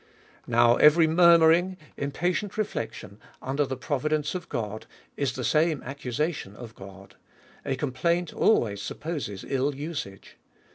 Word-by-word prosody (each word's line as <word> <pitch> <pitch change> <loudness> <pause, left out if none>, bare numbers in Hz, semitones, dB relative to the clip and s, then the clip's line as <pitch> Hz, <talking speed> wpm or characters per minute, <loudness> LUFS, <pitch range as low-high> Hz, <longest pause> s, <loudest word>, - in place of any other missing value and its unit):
Now 120 0 +4
every 160 +2 +6
murmuring, 170 +2 +5 0.2
impatient 175 +8 -2
rejection 115 - -4 0.2
under 140 +2 -1
the 130 - -4
providence 150 +3 -1
of 180 -2 -6
God, 110 -1 -4 0.3
is 140 -3 -1
the 130 - -5
same 155 +4 +1
accusation 135 - -4
of 115 0 -10
God. 95 -1 -13 0.5
A 135 - 0
complaint 170 +6 -1
alwayis 105 - +2
supposes 145 - -5
ill 135 +1 0
usage. 140 -10 -7
140 Hz, 125 wpm, -26 LUFS, 120-165 Hz, 0.5 s, every